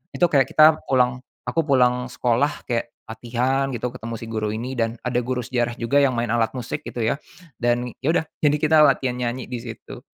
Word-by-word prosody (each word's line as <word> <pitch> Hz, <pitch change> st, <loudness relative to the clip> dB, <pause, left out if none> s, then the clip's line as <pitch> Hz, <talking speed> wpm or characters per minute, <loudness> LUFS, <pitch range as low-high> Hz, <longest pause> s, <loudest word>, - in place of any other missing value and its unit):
itu 175 Hz, -, +4 dB
kayak 135 Hz, -3 st, +4 dB
kita 155 Hz, 0 st, +6 dB
pulang 125 Hz, -1 st, +2 dB, 0.2 s
aku -, -, -2 dB
pulang 125 Hz, -2 st, +3 dB
sekolah 125 Hz, +2 st, 0 dB
kayak 120 Hz, -2 st, -2 dB, 0.2 s
latihan 125 Hz, +4 st, -1 dB
gitu 120 Hz, +1 st, -3 dB
ketemu 115 Hz, -2 st, -6 dB
si 115 Hz, -, -8 dB
guru 110 Hz, -1 st, -2 dB
ini 120 Hz, +4 st, -4 dB
dan 115 Hz, 0 st, 0 dB
ada 125 Hz, -1 st, 0 dB
guru 125 Hz, 0 st, -2 dB
sejarah 120 Hz, -1 st, -1 dB
juga 120 Hz, +5 st, +1 dB
yang 135 Hz, -3 st, +3 dB
main 120 Hz, -1 st, -1 dB
alat 115 Hz, -1 st, +1 dB
musik 125 Hz, -2 st, -4 dB
gitu 120 Hz, -, -4 dB
ya, 115 Hz, +6 st, 0 dB, 0.4 s
dan 120 Hz, 0 st, 0 dB
ya 135 Hz, -, -4 dB
udah -, -, +2 dB, 0.2 s
jadi 150 Hz, -1 st, +3 dB
kita 155 Hz, +1 st, +3 dB
latihan 125 Hz, -2 st, 0 dB
nyanyi 125 Hz, +1 st, -3 dB
di 125 Hz, -, -3 dB
situ. 115 Hz, -1 st, -9 dB
125 Hz, 200 wpm, -23 LUFS, 120-130 Hz, 0.4 s, kita